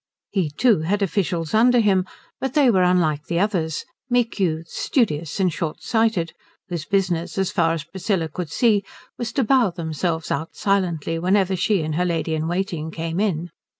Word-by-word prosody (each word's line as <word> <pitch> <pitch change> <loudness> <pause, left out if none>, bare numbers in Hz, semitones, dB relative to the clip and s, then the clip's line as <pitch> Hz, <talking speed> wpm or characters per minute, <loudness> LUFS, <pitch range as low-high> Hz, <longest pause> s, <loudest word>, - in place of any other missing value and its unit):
He 185 -6 0
too 215 - +3
had 200 +6 0
officials 170 -4 -1
under 240 +3 +5
him, 190 -4 +3 0.3
but 265 -1 -3
they 280 -5 +5
were 190 -4 +3
unlike 165 -5 +2
the 170 0 0
others: 175 -6 0 0.2
meek 240 -3 +1
youths, 165 -3 -1
studious 165 - 0
and 185 -3 +2
short 160 -2 -4
sighted, 220 -7 +1 0.4
whose 170 -3 -4
business 185 -4 0
as 190 -1 +1
far 165 -3 +2
as 165 -3 -3
Priscilla 185 0 -2
could 165 +1 -5
see 210 +3 +3 0.4
was 240 -2 -3
to 270 - +2
bow 245 -2 +4
themselves 165 -1 -3
out 160 - -3
silently 170 -5 0
whenever 190 +2 +2
she 185 0 +1
and 155 0 -2
her 180 +4 +1
lady 165 -2 -1
in 160 0 -1
waiting 175 -3 -2
came 165 +2 -3
in. 175 -5 -1
180 Hz, 180 wpm, -22 LUFS, 165-205 Hz, 0.4 s, under